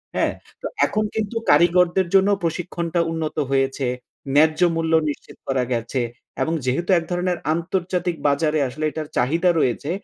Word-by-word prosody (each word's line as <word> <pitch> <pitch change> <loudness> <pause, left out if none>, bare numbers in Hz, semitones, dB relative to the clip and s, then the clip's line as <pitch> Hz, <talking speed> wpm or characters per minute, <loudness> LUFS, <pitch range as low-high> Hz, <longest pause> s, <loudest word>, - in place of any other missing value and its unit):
হ্যাঁ? - - +1 0.3
তো - - -3 0.2
এখন 215 - 0
কিন্তু 220 +1 -2
কারিগরদের 175 +3 +4
জন্য 195 +1 +5
প্রশিক্ষণটা 170 0 -2
উন্নত 160 -2 -3
হয়েছে, 135 0 +1 0.5
ন্যায্য 155 +1 +4 0.2
মূল্য 165 0 0 0.2
নিশ্চিত 145 - -8
করা 135 -2 +1
গেছে। 120 +2 -2 0.4
এবং 160 - +1
যেহেতু 135 +9 -1
১ - - -7
ধরনের 180 0 0 0.2
আন্তর্জাতিক 175 +1 -1
বাজারে 150 +2 +2
আসলে 155 +5 -4
এটার 155 -1 -5
চাহিদা 165 +8 +2
রয়েছে, 130 +2 0
165 Hz, 145 wpm, -22 LUFS, 145-175 Hz, 0.5 s, জন্য